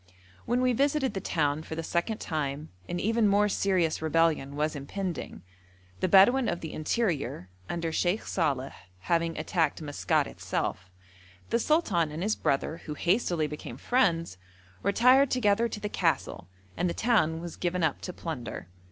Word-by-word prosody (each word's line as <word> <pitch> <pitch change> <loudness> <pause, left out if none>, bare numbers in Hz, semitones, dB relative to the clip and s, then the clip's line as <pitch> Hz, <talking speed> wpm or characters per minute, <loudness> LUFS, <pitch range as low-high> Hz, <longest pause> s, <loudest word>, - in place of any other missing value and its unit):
When 245 +2 +1
we 255 -1 +3
visited 275 -1 +1
the 195 - -2
town 150 -3 0
for 160 - -7
the 165 - -4
second 175 +7 -1
time 150 -1 -3 0.2
an 175 - -2
even 225 +2 +2
more 205 +1 +4
serious 185 -6 +1
rebellion 160 -3 +1
was 150 +1 -1
impending, 170 - -5 0.6
the - - +1
Bedouin 230 +8 +6
of 175 - -3
the 160 - -6
interior, 155 - -1 0.2
under 165 -1 -2
Sheikh 180 +5 0
Saleh, 140 -6 -1 0.3
having 165 - 0
attacked 160 -1 0
Maskat 145 -2 0
itself. 90 0 -4 0.6
The 235 - +3
sultan 210 - +1
and 160 +4 -4
his 215 +2 +1
brother, 140 +3 -1
who 150 - -5
hastily 175 -2 +1
became 150 -5 -7
friends, 170 - +1 0.4
retired 250 +6 +5
together 230 -2 +2
to 215 - -6
the 210 - -3
castle, 145 - -1 0.3
and 180 - 0
the - - -3
town 165 -9 +2
was 170 -1 -7
given 180 0 -1
up 155 -3 0
to 180 - -5
plunder. 145 - -6
170 Hz, 160 wpm, -28 LUFS, 155-210 Hz, 0.6 s, Bedouin